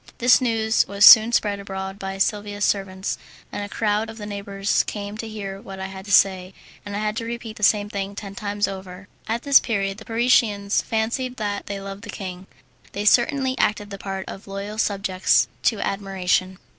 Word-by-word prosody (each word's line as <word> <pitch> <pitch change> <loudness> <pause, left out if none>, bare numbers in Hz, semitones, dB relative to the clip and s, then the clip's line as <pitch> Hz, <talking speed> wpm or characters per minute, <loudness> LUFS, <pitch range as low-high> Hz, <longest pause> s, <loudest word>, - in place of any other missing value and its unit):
This 245 +2 +5
news 225 -2 +1
was 200 +1 +4
soon 220 +1 +10
spread 205 -3 +1
abroad 195 0 -6
by 195 -1 -5
Silvia's 205 +1 0
servants, 195 -1 -2 0.3
and 205 - -4
a 205 - -6
crowd 215 +1 0
of 225 - -9
the 210 - -7
neighbours 200 -1 -1
came 205 0 -5
to 225 - -4
hear 200 -2 -6
what 195 -1 -9
I 190 - -4
had 190 0 -9
to 205 - -7
say, 190 -1 +3 0.3
and 205 0 -6
I - - -2
had 215 0 -1
to 230 - -2
repeat 230 -1 -6
the - - -11
same 205 0 +3
thing 200 -1 -4
ten 200 -1 -7
times 205 0 -2
over. 190 0 -8 0.2
At 230 +2 -2
this 280 -1 +7
period 195 -3 -2
the 220 - -12
Parisians 225 -4 +2
fancied 240 +3 -2
that 205 -2 -3
they 200 -1 -4
loved 195 0 -8
the 220 - -11
king. 185 -1 -7 0.5
They 205 +1 -3
certainly 260 +3 +3
acted 205 -1 0
the 200 - -7
part 195 -1 -5
of 195 - -9
loyal 200 +2 -6
subjects 195 -3 +2 0.2
to 220 - +2
admiration. 190 -1 -1
205 Hz, 195 wpm, -23 LUFS, 195-220 Hz, 0.5 s, soon